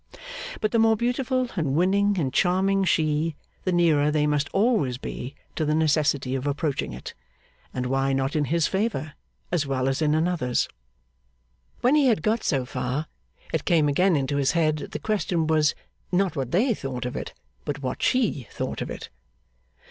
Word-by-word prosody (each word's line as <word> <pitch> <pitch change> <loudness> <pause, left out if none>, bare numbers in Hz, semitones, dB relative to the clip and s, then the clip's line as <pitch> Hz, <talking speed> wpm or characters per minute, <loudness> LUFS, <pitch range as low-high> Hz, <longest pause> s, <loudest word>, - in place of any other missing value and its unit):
But 215 - +1
the 230 - +2
more 225 0 +4
beautiful 250 +2 0
and 150 -7 0
winning 200 +4 +3
and 135 -7 -1
charming 190 +2 +2
she, 155 -2 +1 0.3
the 185 - +1
nearer 160 -4 +3
they 150 0 +2
must 145 -1 +1
always 195 - +2
be 130 +1 -6 0.2
to 160 - 0
the 150 0 +1
necessity 145 -4 +2
of 135 +1 -2
approaching 145 - -1
it. 65 +1 -8 0.6
And 125 0 -3
why 135 +1 +1
not 135 +2 0
in 150 -1 +2
his 165 +3 +1
favour, 195 -7 -1 0.4
as 165 -5 0
well 130 -1 0
as 135 +3 0
in 150 -1 +3
another's? 155 -7 +1 1.1
When 250 +3 +4
he 295 -3 +5
had 215 -10 +2
got 220 +2 +1
so 135 -5 0
far, 125 +4 -2 0.5
it 160 - 0
came 165 -5 +3
again 180 +5 +3
into 140 0 0
his 140 0 +2
head 155 -3 +2
that - - -7
the - - -1
question 190 -6 0
was, 155 -1 +2 0.4
not 190 0 +1
what 135 -4 -2
they 230 - +2
thought 130 - -5
of 125 - -4
it, - - -5 0.3
but 145 -1 -4
what 130 - -3
she 225 - +1
thought - - -4
of - - -3
it. - - -7
155 Hz, 180 wpm, -25 LUFS, 140-190 Hz, 1.1 s, he